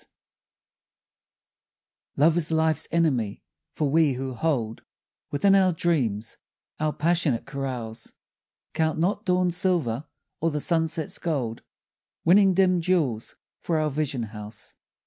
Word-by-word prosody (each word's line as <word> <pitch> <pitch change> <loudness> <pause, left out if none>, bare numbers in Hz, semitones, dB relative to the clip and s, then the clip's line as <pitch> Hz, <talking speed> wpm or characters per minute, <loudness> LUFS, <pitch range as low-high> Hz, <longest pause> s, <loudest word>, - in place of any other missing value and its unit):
S. - - -21 2.1
LOVE 160 +4 +4
is 165 -1 +1
life's 160 -2 +1
enemy, 135 -11 0 0.3
for 150 - 0
we 150 0 +3
who 130 +1 -4
hold 120 -5 -1 0.5
Within 195 +8 +3
our 190 -2 +5
dreams 125 - -1 0.4
our 155 0 +1
passionate 160 -5 +1
carouse, 125 -5 -5 0.6
Count 160 -1 0
not 195 +6 0
dawn's 180 -1 +2
silver 155 -8 0 0.3
or 165 - +1
the 150 -1 -2
sunset's 160 -1 0
gold, 130 -9 -2 0.6
Winning 190 +2 +5
dim 185 -2 +3
jewels 155 -11 0 0.3
for 165 - 0
our 155 -1 0
vision 140 -4 -2
house. 105 -1 -9
155 Hz, 120 wpm, -25 LUFS, 125-170 Hz, 2.1 s, our